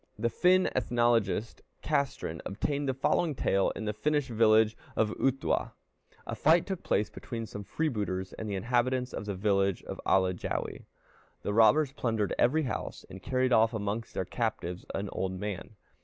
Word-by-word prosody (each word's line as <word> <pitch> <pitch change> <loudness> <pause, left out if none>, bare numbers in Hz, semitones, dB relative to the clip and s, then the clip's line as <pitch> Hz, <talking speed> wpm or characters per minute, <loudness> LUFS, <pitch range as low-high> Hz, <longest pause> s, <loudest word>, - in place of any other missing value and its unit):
The 115 - 0
Finn 185 +1 +4
ethnologist 115 -3 +1 0.2
Castrén 140 - -1
obtained 140 +8 -2
the - - +1
following 155 +3 +1
tale 100 -4 +2
in 110 - -5
the 105 - -1
Finnish 145 +3 0
village 110 -1 +4 0.2
of 110 -1 +2
Uhtuwa: 135 +3 0 0.5
A - - -4
fight 160 +2 +4
took 190 -3 -4
place 105 - 0
between 115 -4 -6
some 105 -1 -7
freebooters 100 -9 -2
and 110 - -5
the 100 - -2
inhabitants 125 +4 0
of 105 - -5
the 100 - -2
village 100 -1 +1
of - - -7
Alajäwi. 95 -2 0 0.6
The 100 - -1
robbers 130 +6 +5
plundered 115 -7 -1
every 155 +6 +3
house, 130 - -4
and 95 - -9
carried 130 +1 +1
off 115 +1 +4
amongst 105 +2 -3
their 95 - -1
captives 95 -5 -3
an 100 +1 -2
old 95 0 -2
man. 105 +2 -5
115 Hz, 160 wpm, -30 LUFS, 100-130 Hz, 0.6 s, robbers